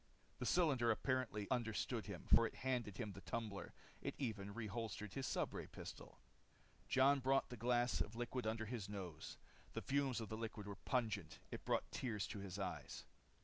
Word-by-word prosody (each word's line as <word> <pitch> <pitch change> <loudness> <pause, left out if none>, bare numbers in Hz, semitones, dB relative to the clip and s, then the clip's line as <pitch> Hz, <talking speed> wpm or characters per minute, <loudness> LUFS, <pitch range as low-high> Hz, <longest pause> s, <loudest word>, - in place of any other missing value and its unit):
The - - 0
cylinder 140 -9 +4
apparently 115 -3 +1
understood 115 -4 +1
him, - - -5
for 115 0 +9
it - - -9
handed 120 -7 +1
him 110 -4 -2
the 95 - -8
tumbler. 110 -3 -3 0.3
It - - -2
even 105 -7 -2
reholstered 110 -2 -3
his 135 -1 -1
stubray - - -1
pistol. - - -8 0.7
Jon 135 +2 +6
brought 135 +1 +3
the 125 - -5
glass 120 +1 +3
of 110 - -2
liquid 120 0 -1
under 110 0 0
his 110 -3 -3
nose. 90 -6 -5 0.4
The - - -2
fumes 135 -3 +2
of 110 -3 -4
the 110 - -2
liquid 110 -2 -4
were 100 -1 -4
pungent. 110 - +1
It - - -5
brought - - +1
tears 115 -6 -1
to 105 - -4
his 95 -1 -4
eyes. 95 -2 -3
115 Hz, 175 wpm, -42 LUFS, 105-125 Hz, 0.7 s, for